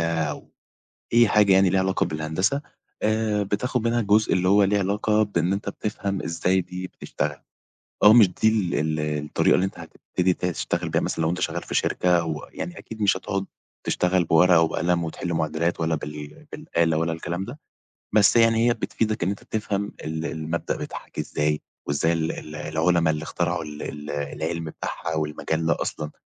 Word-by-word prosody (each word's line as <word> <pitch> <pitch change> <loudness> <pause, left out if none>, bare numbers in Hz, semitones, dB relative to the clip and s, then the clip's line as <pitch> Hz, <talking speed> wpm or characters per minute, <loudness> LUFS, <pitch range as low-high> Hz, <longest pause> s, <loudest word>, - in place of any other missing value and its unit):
أو 80 -2 -2 0.6
أي 120 -1 +6
حاجة 105 -2 +5
يعني 95 0 +5
ليها 95 +1 +3
علاقة 95 0 +1
بالهندسة، 80 - -1 0.4
آآ 110 -1 +1
بتاخد 110 +5 -1
منها 120 +1 +2
الجزء 105 0 +3
اللي 90 0 +2
هو 100 +1 +5
ليه 100 +1 +2
علاقة 105 +2 +1
بإن 90 -4 0
أنت 100 +1 -3
بتفهم 100 -2 -3
إزاي 90 +3 +1
دي 90 +1 -6
بتشتغل، - - -4 0.7
أو 105 - +10
مش 110 -5 +8
دي 100 +5 +1
ال 105 -5 +1
ال 80 +1 0 0.2
الطريقة 75 - +2
اللي 95 - +3
أنت - - -8
هتبتدي 90 0 -1
تشتغل 85 -1 -2
بيها 80 - +2
مثلًا - - -2
لو 80 - +2
أنت 90 - -2
شغال 85 0 -1
في - - -7
شركة 90 -2 +2
و 75 -3 -5
يعني 85 +2 -6
أكيد 110 -1 -8
مش 100 -2 +4
هتقعد 95 0 -3 0.4
تشتغل 90 0 +1
بورقة 85 +1 +5
وقلم 85 +1 +1
وتحل 85 +2 -4
معادلات 80 +2 -1
ولا 80 0 +1
بال 75 0 -7
بالآلة 85 -1 0
ولا 85 0 0
الكلام 85 +3 -3
ده. 125 +8 -9 0.6
بس 105 +2 +5
يعني 115 0 +5
هي 120 - +4
بتفيدك 110 -3 -2
إن 95 - +1
أنت 100 - -5
تفهم 105 -2 -2
ال 80 +1 -3
المبدأ 80 +1 -3
بيتحل - - -7
إزاي، 75 0 -1 0.3
وإزاي 75 +4 +1
ال 80 -1 0
ال 75 0 -8
العلما 80 +2 +1
اللي 75 0 -3
اخترعوا 85 +3 -1
ال 75 -1 -8
ال 75 0 -7
العِلم 80 +3 -3
بتاعها 80 +1 -4
والمجال 80 +1 -2
ده 80 - +2
أصلًا 75 0 -3
90 Hz, 180 wpm, -24 LUFS, 80-100 Hz, 0.7 s, أو